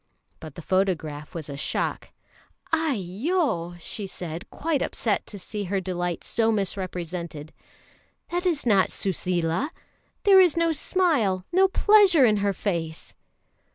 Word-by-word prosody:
But 155 -3 -10
the 170 - -9
photograph 160 -6 -1
was 160 -3 -5
a 140 - -6
shock. 140 - -2 0.6
"Aiyo!" 240 - 0
she 200 +4 -4
said, 170 -2 -7
quite 305 -3 -1
upset 220 -3 -1
to 205 - -8
see 205 +2 -5
her 195 +2 -1
delight 175 -2 -3
so 225 -1 +1
misrepresented, 180 -6 -4 0.8
"that 355 +1 0
is 315 -6 0
not 200 -5 +4
Suseela! 180 - -1 0.5
There 390 -2 +7
is 355 -4 +5
no 335 0 +3
smile, 285 - +1
no 380 +2 +5
pleasure 385 -7 +5
in 215 -3 +3
her 200 0 +1
face!" 170 -5 -4
195 Hz, 130 wpm, -25 LUFS, -, 0.8 s, There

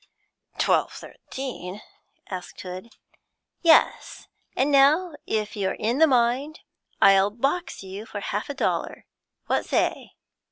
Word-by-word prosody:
'Twelve - - +2
thirteen?' 215 -7 -8 0.4
asked 185 -2 -7
Hood. 185 +5 -9 0.7
'Yes. 330 -2 +3 0.3
And 275 +3 +1
now 300 +6 +4
if 215 -1 -2
you're 195 -2 -1
in 235 +5 -1
the 320 - +7
mind, 260 +4 +1 0.4
I'll 195 0 +6
box 275 - -2
you 195 +3 -8
for 205 - -6
half 205 +4 -4
a 285 - -4
dollar - - -2 0.4
what - - 0
say?' - - -1
235 Hz, 120 wpm, -25 LUFS, 195-280 Hz, 0.7 s, the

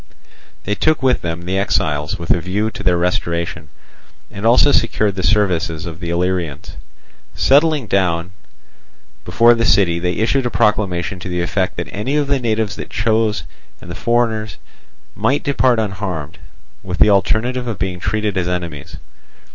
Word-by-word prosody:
They 105 - -1
took 155 +6 +1
with 130 -1 +2
them 85 0 -4
the 95 +2 -1
exiles, 75 -6 0
with 85 - -2
a 85 - +2
view 105 +5 -1
to - - -8
their 90 -1 +2
restoration, 85 -2 -2 0.6
and 100 +3 -2
also 125 +5 +5
secured 110 -4 +1
the 95 - -4
services 90 -3 +1
of 85 -1 -7
the 85 -2 -5
Illyrians. 85 -3 -2 0.6
Sitting 145 0 +3
down 90 -3 0 0.9
before 120 +1 +5
the 115 0 0
city, 95 -6 +3
they 90 +1 -1
issued 120 +5 +1
a - - -2
proclamation 95 -5 0
to 90 - -7
the 90 0 -1
effect 90 +2 -1
that - - -3
any 105 +8 -2
of 145 - +1
the 140 -1 0
natives 110 -3 -1
that - - -7
chose, 110 0 0 0.4
and 85 - -10
the - - -5
foreigners, 110 -3 0 0.6
might 115 - 0
depart 130 -4 +2
unharmed, 95 -7 -4 0.4
with 90 -2 -5
the 105 - +5
alternative 120 +5 +1
of 115 -4 -3
being 90 -1 -3
treated 105 +1 -1
as 90 -1 0
enemies. 85 -5 -5
100 Hz, 165 wpm, -18 LUFS, 85-115 Hz, 0.9 s, also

